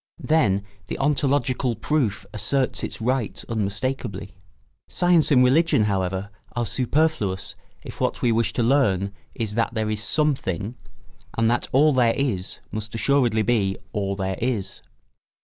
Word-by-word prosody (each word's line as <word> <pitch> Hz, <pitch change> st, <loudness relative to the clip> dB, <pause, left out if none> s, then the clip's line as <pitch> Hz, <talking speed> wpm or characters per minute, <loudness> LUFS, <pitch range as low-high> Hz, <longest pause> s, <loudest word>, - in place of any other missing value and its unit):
Then 110 Hz, -12 st, +2 dB, 0.2 s
the -, -, -4 dB
ontological 135 Hz, -3 st, +1 dB
proof 110 Hz, -5 st, -1 dB
asserts 130 Hz, +6 st, -1 dB
its -, -, -5 dB
rights 125 Hz, -1 st, -1 dB
unmistakably. 105 Hz, -2 st, -3 dB, 0.5 s
Science 175 Hz, -3 st, +3 dB
and 130 Hz, -4 st, +6 dB
religion, 145 Hz, -1 st, +4 dB
however, 95 Hz, -1 st, -1 dB, 0.2 s
are 120 Hz, -1 st, 0 dB
superfluous 125 Hz, -4 st, 0 dB, 0.3 s
if -, -, -9 dB
what -, -, 0 dB
we 120 Hz, -, +4 dB
wish 115 Hz, 0 st, +1 dB
to 120 Hz, -, 0 dB
learn 100 Hz, -7 st, +2 dB, 0.2 s
is 110 Hz, -2 st, -2 dB
that 115 Hz, +2 st, 0 dB
there 110 Hz, -1 st, 0 dB
is 105 Hz, 0 st, -3 dB
Something, 120 Hz, -, 0 dB, 0.6 s
and 115 Hz, 0 st, +3 dB
that 120 Hz, -, 0 dB
All 150 Hz, +3 st, +5 dB
there 120 Hz, -3 st, +3 dB
is 110 Hz, -10 st, -2 dB
must 110 Hz, +1 st, -4 dB
assuredly 120 Hz, -3 st, +2 dB
be 100 Hz, -5 st, +1 dB, 0.2 s
All 100 Hz, -2 st, -1 dB
there 95 Hz, -1 st, -3 dB
is. 115 Hz, -5 st, -2 dB
115 Hz, 140 wpm, -24 LUFS, 100-135 Hz, 0.6 s, and